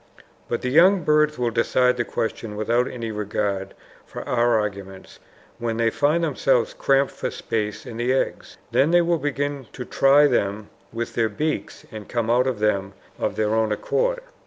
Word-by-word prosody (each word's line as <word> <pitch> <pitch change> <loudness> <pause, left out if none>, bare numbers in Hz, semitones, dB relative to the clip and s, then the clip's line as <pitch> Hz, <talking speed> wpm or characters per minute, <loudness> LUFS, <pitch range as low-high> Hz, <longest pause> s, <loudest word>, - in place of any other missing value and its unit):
But 120 - -2
the 125 - 0
young 180 +5 +5
birds 150 0 +3
will 120 -1 0
decide 125 +2 +2
the 120 - -1
question 110 -1 -4
without 115 +4 +1
any 115 -3 -5
regard 100 -2 -3 0.3
for - - -9
our 120 -2 +2
arguments 100 -2 -6 0.4
when 115 -1 -2
they 115 -1 +2
find 150 +7 +1
themselves 135 -5 +1
cramped 135 0 +2
for - - -4
space 105 0 -3
in 120 -3 -8
the 120 +2 0
eggs. 130 - -2
Then 140 - +3
they 175 +1 +5
will 170 -1 +1
begin 145 -2 -3
to 125 - -6
try 140 +4 +5
them 105 -6 0 0.2
with 115 +1 -4
their 115 -1 +1
beaks 150 +9 -3
and 110 -2 -9
come 115 -1 -1
out 125 +2 +3
of 130 -4 -1
them 100 -2 0 0.3
of - - -1
their 110 0 0
own 110 -1 +1
accord. - - 0
120 Hz, 180 wpm, -23 LUFS, 110-140 Hz, 0.4 s, young